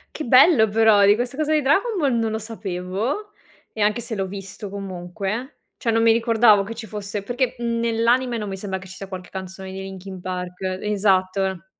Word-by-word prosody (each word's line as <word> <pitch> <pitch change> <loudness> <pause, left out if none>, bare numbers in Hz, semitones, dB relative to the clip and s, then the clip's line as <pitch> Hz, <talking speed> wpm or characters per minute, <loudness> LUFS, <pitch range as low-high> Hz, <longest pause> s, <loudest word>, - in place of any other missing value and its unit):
Che 310 - -4
bello, 255 -1 +6
però 210 -1 +5
di 205 +1 +6
questa 245 +3 -3
cosa 310 0 +1
di 305 - +3
Dragon 390 - +2
Ball 280 -7 +2
non 225 -1 0
lo 220 - -1
sapevo, 215 - -4 0.4
ehm, 210 -2 0
anche 215 +3 +1
se 235 0 -6
l'ho 195 -2 -2
visto 195 +1 -7
comunque, 195 - -5 0.2
cioè 230 - -2
non 225 0 +3
mi 230 - +6
ricordavo 225 -3 +4
che 225 +3 -6
ci 225 0 -7
fosse, 205 0 -5
perché, 245 +3 -1
mhmm, 235 -1 -1
nell'anime 235 +2 +1
non 210 -2 -4
mi 195 - -5
sembra 190 -1 -4
che 190 0 -11
ci 190 - -10
sia 195 - -7
qualche 185 -2 -8
canzone 190 0 -7
dei 190 0 -6
Linkin 190 0 -8
Park 180 0 -5 0.2
Esatto. 190 -3 +1
210 Hz, 205 wpm, -22 LUFS, 190-235 Hz, 0.4 s, bello